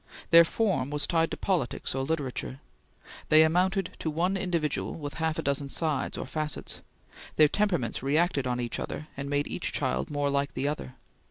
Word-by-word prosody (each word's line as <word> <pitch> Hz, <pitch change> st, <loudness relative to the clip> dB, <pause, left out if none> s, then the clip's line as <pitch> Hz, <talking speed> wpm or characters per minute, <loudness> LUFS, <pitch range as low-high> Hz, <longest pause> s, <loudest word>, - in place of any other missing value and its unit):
Their 170 Hz, 0 st, +10 dB
form 190 Hz, -, 0 dB
was 150 Hz, 0 st, +1 dB
tied 165 Hz, -2 st, +2 dB
to -, -, -5 dB
politics 175 Hz, -10 st, -1 dB
or 135 Hz, -, -1 dB
literature. 135 Hz, -3 st, -3 dB, 0.7 s
They 155 Hz, +1 st, +8 dB
amounted 180 Hz, +4 st, +2 dB
to 160 Hz, -, -2 dB
one 175 Hz, +5 st, 0 dB
individual 170 Hz, -6 st, -1 dB
with 145 Hz, -3 st, -6 dB
half 160 Hz, -1 st, 0 dB
a -, -, -2 dB
dozen 140 Hz, 0 st, -1 dB
sides 155 Hz, -2 st, -1 dB
or -, -, -4 dB
facets; 150 Hz, +1 st, -4 dB, 0.5 s
their 155 Hz, -, +7 dB
temperaments 175 Hz, -, 0 dB
reacted 145 Hz, 0 st, +1 dB
on 125 Hz, 0 st, -1 dB
each 120 Hz, -1 st, -3 dB
other 155 Hz, -, -5 dB
and 140 Hz, +1 st, -5 dB
made 145 Hz, 0 st, +1 dB
each -, -, -3 dB
child 65 Hz, +1 st, -1 dB
more 145 Hz, -1 st, 0 dB
like 140 Hz, 0 st, -1 dB
the 140 Hz, -, -1 dB
other. 145 Hz, -3 st, -4 dB
150 Hz, 180 wpm, -28 LUFS, 140-170 Hz, 0.7 s, Their